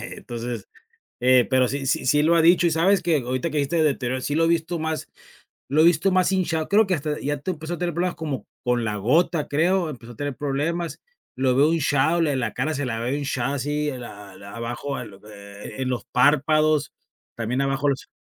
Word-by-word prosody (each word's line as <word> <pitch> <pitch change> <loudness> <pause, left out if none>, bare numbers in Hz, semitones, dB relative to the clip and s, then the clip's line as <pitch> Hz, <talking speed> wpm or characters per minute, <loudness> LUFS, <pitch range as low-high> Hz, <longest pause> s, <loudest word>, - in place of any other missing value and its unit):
entonces, 120 -3 -6 0.5
eh, 125 0 +5
pero 130 -1 +3
sí 135 +1 -3
sí 130 - 0
sí 150 +3 +4
lo 165 +3 +4
ha 165 - +4
dicho. 175 +1 +5
Y - - +3
¿sabes 180 +5 +3
qué?, 160 -5 +1
ahorita 130 +7 -2
que 150 - -1
dijiste 145 +4 +1
deterioro, 130 -4 0
sí, 145 - -2
lo 165 +2 +3
he - - +2
visto 170 +1 0
más 160 0 -3 0.6
lo 150 +3 +3
he - - +6
visto 175 +3 +3
más 185 0 +3
hinchado. 170 -4 0
Creo 215 +2 +4
que 190 - -1
hasta 150 -2 -2
ya 145 +1 -2
t 165 +7 -3
empezó 165 0 -5
a - - -11
tener 175 0 -2
problemas 175 +2 -1
como 150 -6 -4 0.2
con 125 -1 +1
la 105 -2 -2
gota, 150 - +1
creo. 170 +3 +1
Empezó 120 -5 -9
a - - -12
tener 145 +2 -4
problemas. 150 +3 -2 0.4
Lo 130 -1 +1
veo 145 +5 +4
hinchado 160 +1 +2
le 150 -4 +1
la 125 -2 -2
cara 145 +5 -1
se 145 0 -2
la 115 -2 -3
veo 125 +4 -1
hinchada 140 -2 -2
así 150 +2 -1
la 110 -6 -9
la 100 +1 -11
abajo, 120 +4 -4
eh, 120 - -7 0.7
e - - -2
en 130 - -1
los 125 -2 -3
párpados 155 +3 +2 0.4
también 120 +3 -2
abajo 135 +1 +1
los 135 - -3
145 Hz, 215 wpm, -23 LUFS, 130-165 Hz, 0.7 s, he